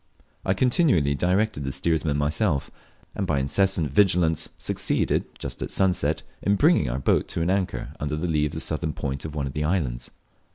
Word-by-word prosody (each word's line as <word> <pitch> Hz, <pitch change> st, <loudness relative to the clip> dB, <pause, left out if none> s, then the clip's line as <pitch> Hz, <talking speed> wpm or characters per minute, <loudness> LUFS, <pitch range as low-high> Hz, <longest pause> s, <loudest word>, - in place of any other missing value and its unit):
I 95 Hz, -, +1 dB
continually 120 Hz, -, +3 dB
directed 90 Hz, +1 st, 0 dB
the 70 Hz, -, -2 dB
steersman 80 Hz, -1 st, 0 dB
myself, 75 Hz, +1 st, 0 dB, 0.4 s
and -, -, -2 dB
by -, -, +1 dB
incessant 80 Hz, +2 st, +1 dB
vigilance 80 Hz, -2 st, +3 dB
succeeded, -, -, 0 dB
just -, -, -6 dB
at -, -, -3 dB
sunset, 95 Hz, -2 st, +1 dB, 0.2 s
in 100 Hz, -, +2 dB
bringing 140 Hz, -, +3 dB
our -, -, -2 dB
boat 65 Hz, -, +1 dB
to -, -, -2 dB
an 90 Hz, -, +1 dB
anchor 95 Hz, -2 st, -2 dB
under 75 Hz, +1 st, -2 dB
the 80 Hz, +4 st, -2 dB
lee 75 Hz, -2 st, +1 dB
of 75 Hz, -, -8 dB
the 80 Hz, -, -3 dB
southern 80 Hz, -1 st, -2 dB
point 70 Hz, +1 st, -4 dB
of 80 Hz, -1 st, -6 dB
one 70 Hz, -2 st, -1 dB
of 65 Hz, -, -5 dB
the 75 Hz, -, -2 dB
islands. 70 Hz, -8 st, -1 dB
80 Hz, 190 wpm, -25 LUFS, 70-95 Hz, 0.4 s, continually